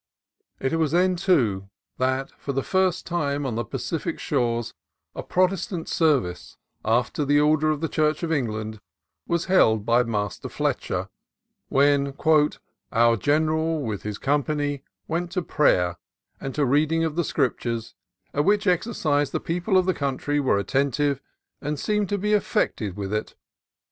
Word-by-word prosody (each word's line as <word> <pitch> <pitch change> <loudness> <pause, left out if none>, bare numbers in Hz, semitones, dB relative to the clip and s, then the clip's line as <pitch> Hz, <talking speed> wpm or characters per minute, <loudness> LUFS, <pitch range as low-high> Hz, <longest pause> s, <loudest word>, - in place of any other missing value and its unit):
It 135 - -1
was 155 -2 +1
then, 180 +1 +3
too, 120 - +1 0.3
that 130 +1 0
for 140 - -6
the 135 0 -1
first 185 -1 +1
time 145 -5 -1
on 130 - -2
the 115 +2 -1
Pa - - -5
cific - - -3
shores 120 -1 -1 0.4
a - - -5
Protestant 185 -2 0
service, 135 - 0 0.3
after 120 +6 +1
the 145 +1 +3
order 155 +1 +3
of 155 -1 -1
the 165 - 0
Church 155 0 0
of 165 - -1
England, 110 -6 -2 0.5
was 170 -1 0
held 110 - +3
by 120 +1 +4
Master 105 -5 -3
Fletcher; - - -2 0.6
when 140 0 +3 0.8
"our 115 0 +4
General 155 - +1
with 110 -5 -3
his 105 -1 -5
company 145 0 0 0.3
went 170 +2 -2
to 180 -2 -1
prayer, 90 - +2 0.4
and 135 - -5
to 150 - +2
reading 155 +5 +2
of 160 -2 -1
the 175 - +1
Scriptures, 120 -6 -1 0.4
at 145 - +1
which 205 +3 +2
exercise 165 - +1
the - - -2
people 180 +4 0
of 185 - +3
the 185 - +2
country 145 0 -1
were 135 -7 +2
attentive, 140 +6 0 0.4
and 150 0 -3
seemed 210 -1 0
greatly 205 - -1
to - - -7
be 210 0 +2
affected 105 - 0
with 100 0 -4
it." 105 - -3
145 Hz, 160 wpm, -24 LUFS, 120-165 Hz, 0.8 s, by